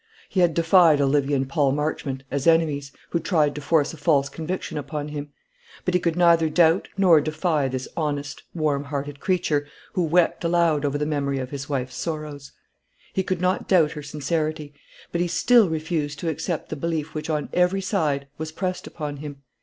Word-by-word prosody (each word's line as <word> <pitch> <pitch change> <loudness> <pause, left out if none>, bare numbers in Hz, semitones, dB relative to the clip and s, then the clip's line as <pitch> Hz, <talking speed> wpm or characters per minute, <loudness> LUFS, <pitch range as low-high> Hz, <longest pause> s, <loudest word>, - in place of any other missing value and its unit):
He 190 - -1
had 175 -3 +3
defied 165 -2 +5
Olivia 140 0 +2
and 135 -1 0
Paul 140 -2 +2
Marchmont, 145 -2 -2
as 140 +2 -1
enemies, 150 -4 +2 0.2
who 170 - +1
tried 155 -5 +2
to 150 - -6
force 150 0 +2
a - - -9
false 145 -2 +2
conviction 165 +1 -4
upon 150 +1 -5
him; 145 -1 -6 0.6
but 180 - 0
he 180 - +4
could 170 -2 0
neither 170 -2 +4
doubt 165 +2 +3
nor 175 -6 +6
defy 155 -1 0
this 130 0 -4
honest, 145 -2 -3
warm 145 -3 0
hearted 140 0 -4
creature, 155 -6 0 0.3
who 185 - 0
wept 170 +2 +2
aloud 170 -3 +2
over 145 0 0
the 150 - -1
memory 140 -2 -1
of 130 -1 -4
his 140 0 -6
wife's 130 -3 -3
sorrows. 150 -4 -5 0.6
He 190 - +1
could 185 -2 -2
not 185 +1 0
doubt 165 -6 +4
her 150 - -6
sincerity; 150 +1 -3 0.4
but 170 - -1
he 175 - +1
still 225 +3 +4
refused 155 -2 -2
to 170 - -1
accept 160 +1 -3
the - - -3
belief 160 0 -3
which 155 +1 -5
on 150 -2 -1
every 180 +2 +2
side 155 -8 0
was 160 0 -4
pressed 185 +2 -3
upon 150 -3 -5
him. 140 -1 -8
155 Hz, 190 wpm, -24 LUFS, 145-170 Hz, 0.6 s, nor